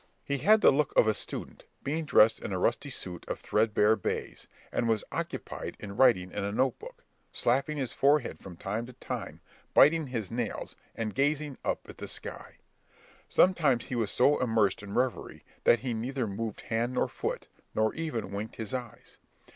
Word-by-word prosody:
He 140 -1 -1
had 215 +6 +5
the - - +7
look 150 +1 +1
of - - +6
a 110 - +4
student, - - -7 0.2
being 155 +3 -2
dressed 115 -5 +5
in - - -5
a 95 - -1
rusty 120 +9 0
suit 90 -9 -5
of - - -3
threadbare 105 0 +3
baize, 100 - -4 0.2
and 115 - 0
was 110 -2 +2
occupied - - -5
in 100 -2 -7
writing 105 -8 +4
in 105 - -3
a 100 - -1
note 130 +3 +1
book, - - -11 0.3
slapping 135 +5 +1
his 130 -5 -2
forehead 140 -1 +2
from 90 -3 -10
time 105 +6 -3
to 125 - -11
time, - - -6 0.3
biting 155 +1 +6
his 115 -7 -4
nails, 115 -2 -3 0.2
and 110 -2 -3
gazing 145 +3 0
up - - -2
at - - -12
the - - -5
sky. - - -6 0.7
Sometimes 155 -10 +3
he 125 - -4
was 115 -4 0
so 140 +8 +3
immersed 110 -6 +2
in 100 -1 -7
reverie, 125 0 -1 0.2
that 120 - +5
he 125 -2 -2
neither 125 +3 -2
moved 110 +1 -4
hand 120 +2 -1
nor - - +2
foot, - - -4 0.3
nor 110 0 +2
even 155 -11 -3
winked 105 +2 -5
his 110 -1 -5
eyes. 125 -4 -7
120 Hz, 185 wpm, -29 LUFS, 105-135 Hz, 0.7 s, the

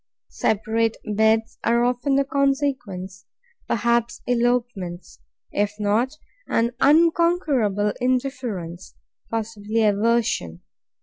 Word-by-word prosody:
Separate 220 +1 0
beds 220 +2 +1
are 235 +1 +3
often 250 +3 0
the 275 - +3
consequence; 265 - -1 0.4
perhaps 235 +1 0
elopements: 235 - -1 0.3
if 205 0 -1
not, 225 +8 0 0.3
an 230 +1 +1
unconquerable 295 - +3
indifference, 245 -9 -2 0.3
possibly 225 0 -2
aversion. 210 - +1
230 Hz, 80 wpm, -23 LUFS, 205-255 Hz, 0.4 s, are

